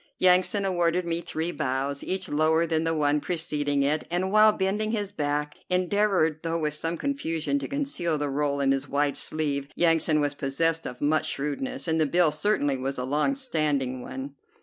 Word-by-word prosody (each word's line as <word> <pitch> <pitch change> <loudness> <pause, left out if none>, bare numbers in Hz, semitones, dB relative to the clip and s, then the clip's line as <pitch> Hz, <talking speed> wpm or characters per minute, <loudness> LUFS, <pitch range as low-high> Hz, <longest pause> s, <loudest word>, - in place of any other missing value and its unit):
Yansan 185 +2 +3
awarded 175 -1 +1
me 170 0 -1
three 165 0 -3
bows, 140 -2 -2
each 190 0 -1
lower 160 +2 +2
than 160 -1 0
the 165 - +1
one 150 -1 +2
preceding 145 -4 -1
it, 150 +3 +1
and, 180 +2 -1
while 215 +1 +6
bending 205 +2 -1
his 205 -3 -2
back, 150 -4 -2
endeavored, 180 -3 +1
though 165 0 -1
with 150 -2 -1
some 165 +3 -3
confusion, 280 - -1
to - - -5
conceal 275 - -1
the 145 0 -2
roll 140 0 -1
in 135 -1 +2
his 135 0 -1
wide 145 0 +1
sleeve. 145 -3 -2
Yansan 165 -2 +3
was 145 -1 0
possessed 160 +4 -1
of 125 - -8
much 155 +2 +1
shrewdness, 140 +2 -3
and 160 0 +1
the 155 - +3
bill 170 +1 +4
certainly 150 -4 0
was 135 +1 -3
a 125 - -2
long 150 - +1
standing 150 - -1
one. 135 +3 -7
155 Hz, 185 wpm, -26 LUFS, 145-180 Hz, -, while